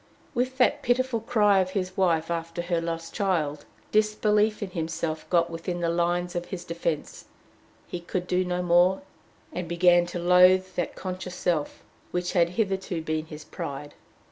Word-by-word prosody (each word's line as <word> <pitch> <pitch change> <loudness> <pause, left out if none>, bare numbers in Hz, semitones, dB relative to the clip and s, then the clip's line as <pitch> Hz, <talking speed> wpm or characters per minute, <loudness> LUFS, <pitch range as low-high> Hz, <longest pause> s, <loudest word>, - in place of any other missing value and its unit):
With 255 +2 -1
that 250 - +3
pitiful 250 -1 +1
cry 210 -3 +3
of 185 -1 +1
his 185 -1 -2
wife 170 -3 +1
after 165 0 -3
her 170 -1 0
lost 165 0 -4
child, 160 -8 -1 0.3
disbelief 215 0 +2
in 190 - -6
himself 165 -2 -3
got 170 -1 +2
within 170 +2 -4
the 170 -1 0
lines 175 +1 0
of 175 0 -2
his 180 -2 -6
defense; 170 -2 -3 0.6
he 175 - -5
could 175 +1 -3
do 180 +1 +1
no 180 0 -2
more, 180 +2 +4 0.5
and 180 -1 -4
began 175 +1 +4
to 175 - -5
loathe 180 +2 +5
that 175 - -2
conscious 185 -1 -5
self 160 -5 -1 0.3
which 180 0 -2
had 170 -2 +3
hitherto 190 -5 -1
been 155 0 -2
his 155 -1 -9
pride. 145 +1 -6
175 Hz, 165 wpm, -26 LUFS, 170-190 Hz, 0.6 s, loathe